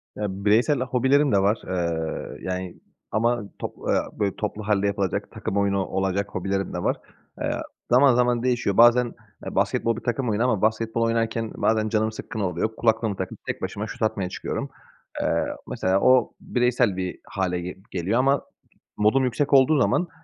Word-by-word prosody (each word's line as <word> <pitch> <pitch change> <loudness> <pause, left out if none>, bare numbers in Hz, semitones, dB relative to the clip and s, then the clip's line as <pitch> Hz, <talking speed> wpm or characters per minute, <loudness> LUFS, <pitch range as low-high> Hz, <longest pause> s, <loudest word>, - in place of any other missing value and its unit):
Ya, 105 - -3 0.2
bireysel 120 +7 +4
hobilerim 130 +3 +2
de 100 - +4
var. 100 +3 +2
Eee, 85 -3 -2
yani, 90 -1 -4 0.4
ama 120 +1 +1 0.2
top - - -5
aaa, - - -1
böyle, 100 -2 0
toplu 105 0 -4
hâlde 100 -1 +2
yapılacak, 100 -2 -2
takım 100 - -4
oyunu 100 -1 +1
olacak 95 +1 -1
hobilerim 95 +1 -2
de - - -3
var. - - +1 0.5
Eee, - - 0 0.4
zaman 130 0 +6
zaman 120 -1 +2
değişiyor. 120 -6 0
Bazen 120 +1 +6 0.3
basketbol 115 -1 0
bir - - -8
takım 125 0 -1
oyunu 110 +3 +1
ama 115 -6 +1
basketbol 110 +1 0
oynarken 115 -1 -1
bazen 110 -1 +1
canım 110 0 +1
sıkkın 110 0 -7
oluyor. 95 +3 -1
Kulaklığımı 110 -3 +1
takıp 95 -1 -5
tek - - -4
başıma 105 +2 -4
şut 110 - -9
atmaya 100 -4 0
çıkıyorum. - - -4 0.5
Eee, - - +1 0.2
mesela 95 +1 0
o 130 0 +4
bireysel 125 -5 +1
bir 90 -1 -4
hâle 95 -5 -1
ge 90 +2 -6
geliyor 95 +6 0
ama 135 +1 +3 0.6
modum 110 +6 +3
yüksek 135 +4 -1
olduğu 140 +3 +6
zaman, 175 +5 +2
110 Hz, 165 wpm, -24 LUFS, 95-120 Hz, 0.6 s, zaman